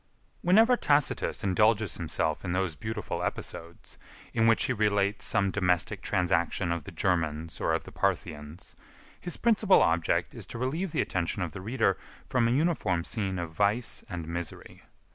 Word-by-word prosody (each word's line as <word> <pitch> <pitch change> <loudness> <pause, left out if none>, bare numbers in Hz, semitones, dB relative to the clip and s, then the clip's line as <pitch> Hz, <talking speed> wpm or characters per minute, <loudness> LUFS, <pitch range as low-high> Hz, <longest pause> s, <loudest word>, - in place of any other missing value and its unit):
Whenever 225 +8 +5
Tacitus 145 - +1
indulges 105 +2 +2
himself 80 -2 -1
in 90 -2 -2
those 90 -3 -1
beautiful 110 +5 -4
episodes, 85 +1 -6 0.3
in 115 0 +3
which 115 - +4
he 130 - +1
relates 100 -2 +1
some 100 -3 +2
domestic 90 -3 0
transaction 85 0 0
of 85 -1 -3
the - - -8
Germans 80 -3 -1
or - - +1
of - - -1
the - - -11
Parthians, 75 +1 -3 0.4
his 175 - -3
principal 215 -4 +4
object 85 0 +1
is - - -6
to - - -7
relieve 155 +9 -2
the - - +1
attention 90 +2 -2
of 85 - -4
the 95 - -8
reader 115 +7 0 0.3
from 120 -3 +1
a - - +1
uniform 135 - +1
scene 95 -1 -2
of 85 -2 -4
vice 105 +6 +1
and 85 -3 -5
misery. 85 -1 -6
100 Hz, 160 wpm, -28 LUFS, 85-115 Hz, 0.4 s, Whenever